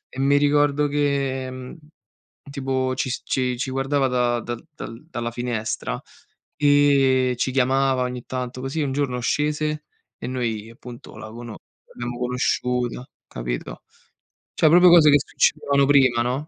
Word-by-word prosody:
E - - -6
mi 140 +1 +3
ricordo 145 0 +2
che, 135 -1 -2 0.7
tipo, 130 -2 -1
ci 130 - -1
s - - -4
ci 125 -1 -1
ci 130 +2 -3
guardava 135 +1 0
da 120 -1 +1
dal 120 +3 -7 0.4
dalla 120 -7 -4
finestra 120 -2 -3 0.6
e 140 -3 +3
ci 130 - 0
chiamava 135 0 +2
ogni 125 -1 -5
tanto. 125 0 -5
Così, 135 +4 -3
un 135 -2 -1
giorno, 135 -3 -1
scese 150 +4 -1 0.3
e - - -6
noi 115 -4 -3
appunto 120 +1 -12
la 110 - -8
cono 120 0 -9 0.3
l'abbiamo 120 0 -6
conosciuta, 125 0 -1 0.2
capito. - - -6 0.7
Cioè, 155 - +4
proprio 180 +3 +7
cose 165 -3 +7
che 145 - +7
succedevano 140 0 +1
prima, 130 -4 +4
no. 130 +5 -2
130 Hz, 140 wpm, -23 LUFS, 125-140 Hz, 0.7 s, proprio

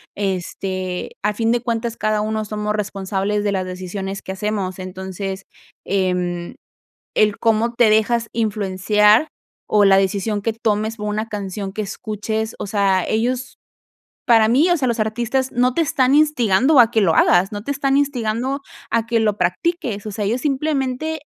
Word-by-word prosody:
Este, 185 -1 -3
al 210 +1 +1
fin 225 +2 0
de 240 - 0
cuentas, 230 -1 -2
cada 215 0 0
uno 215 0 -1
somos 210 0 -2
responsables 200 0 -2
de 205 -1 0
las 190 -1 -1
decisiones 185 +2 -5
que 190 - -6
hacemos. 195 -2 -3
Entonces, 190 +1 -6 0.4
em, 180 -2 -1 0.6
el 210 -1 +3
cómo 225 +1 +1
te 235 -2 +4
dejas 225 +2 +2
influenciar, 210 +3 +2 0.4
o 210 -1 +6
la 195 -1 +6
decisión 200 +2 0
que 225 - 0
tomes 220 0 -1
por 210 -1 -4
una 215 +1 -2
canción 200 -1 -5
que 215 - -4
escuches, 215 +2 -4
o - - -4
sea, 195 -2 +1
ellos 245 +3 -1 0.7
para 225 -3 +5
mí, 280 +10 +4
o 350 - +4
sea, 275 -5 -1
los 235 -2 0
artistas 240 +4 -1
no 250 +1 +2
te - - +1
están 270 -3 +2
instigando 275 -3 +3
a 235 -2 +7
que 220 - +3
lo 175 -6 +3
hagas, 180 +2 +4
no 205 -1 -6
te 280 - -1
están 275 0 +1
instigando 260 -1 -1 0.3
a 230 0 +1
que 230 0 +1
lo 215 -2 +1
practiques, 210 - -1
o 210 - -4
sea, 205 +1 -3
ellos 230 +5 0
simplemente 295 +1 -1
215 Hz, 170 wpm, -20 LUFS, 195-235 Hz, 0.7 s, a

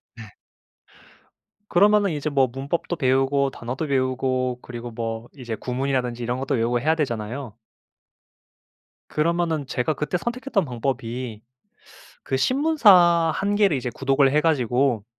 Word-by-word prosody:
네. - - -11 1.4
그러면은 205 +2 +4
이제 150 0 -2
뭐 135 -2 +3
문법도 140 +7 -3
배우고 135 0 +2
단어도 125 +7 -5
외우고 130 -2 0
그리고 120 0 -7
뭐 115 0 -5
이제 120 -3 -6
구문이라든지 125 -1 -2
이런 125 +2 -2
것도 135 0 -1
외우고 120 +1 +1
해야 160 +2 +2
되잖아요. 120 -3 -3 1.6
그러면은 165 -1 0
제가 125 +4 -1
그때 150 +5 -2
선택했던 240 -1 -2
방법이 120 -2 -4 0.8
그 135 - -2
신문사 185 - +4
1 200 +1 -1
개를 200 -8 +3
이제 125 - -4
구독을 135 +1 +2
해 150 +2 +3
가지고 125 -6 +1
135 Hz, 295 characters per minute, -23 LUFS, 125-160 Hz, 1.6 s, 그러면은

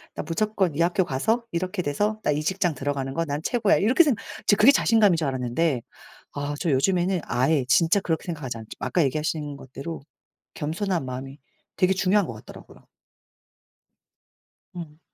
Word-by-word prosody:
나 - - -4
무조건 190 +1 0
이 165 - 0
학교 175 +2 +2
가서 220 - 0
이렇게 180 +3 -2
돼서 205 +8 -1
나 - - +2
이 150 +1 0
직장 175 +1 0
들어가는 135 -1 -3
거 165 +3 -1
난 145 -1 -3
최고야.' 225 -2 +2
이렇게 250 - +4
생각 280 -8 0 0.2
저 - - +6
그게 215 +7 +7
자신감인 215 -9 +4
줄 160 -3 -1
알았는데 130 +2 0 0.5
아 145 +1 -3
저 165 - 0
요즘에는 180 +6 +2
아예 130 +3 +1
진짜 165 +8 +4
그렇게 165 -4 -2
생각하지 150 -8 -4
않죠. 110 -1 -11
아까 130 +7 +1
얘기하신 150 +1 -2
것대로 140 +5 -8 0.5
겸손한 170 -1 -2
마음이 135 +2 -7 0.4
되게 185 -1 +3
중요한 190 +1 +2
것 - - -6
같더라고요. 110 - -14 1.9
음. 160 -3 -8
165 Hz, 355 characters per minute, -25 LUFS, 140-190 Hz, 1.9 s, 그게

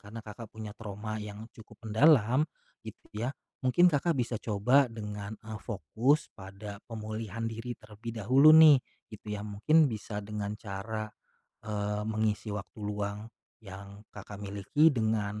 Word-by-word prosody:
karena 105 +3 -9
Kakak, 105 +1 -9
punya 110 -1 -7
trauma 110 0 -5
yang 105 +1 -8
cukup 110 0 -14
mendalam, 130 +2 +5 0.4
gitu - - -11
ya 115 +5 -2 0.3
mungkin 175 +8 +5
Kakak, 160 +3 +1
bisa 120 -1 -1
coba 125 +6 +3
dengan, 105 -1 -6
eee, 110 -2 -8
fokus 120 +7 +1
pada 100 +1 -9
pemulihan 110 0 -5
diri 115 +2 -4
terlebih 110 +2 -9
dahulu 130 +8 +6
nih 155 -4 +9 0.3
gitu 105 0 -11
ya 105 - -3
mungkin 145 +10 +4
bisa 105 -1 -5
dengan 105 0 -4
cara, 110 +2 -5 0.6
eee, 105 0 -2
mengisi 110 0 -1
waktu 100 -1 -7
luang, 105 0 -3 0.4
yang 100 0 -11
Kakak, 100 0 -9
miliki 100 +10 +2
dengan, 110 -2 0
110 Hz, 140 wpm, -30 LUFS, 105-115 Hz, 0.6 s, nih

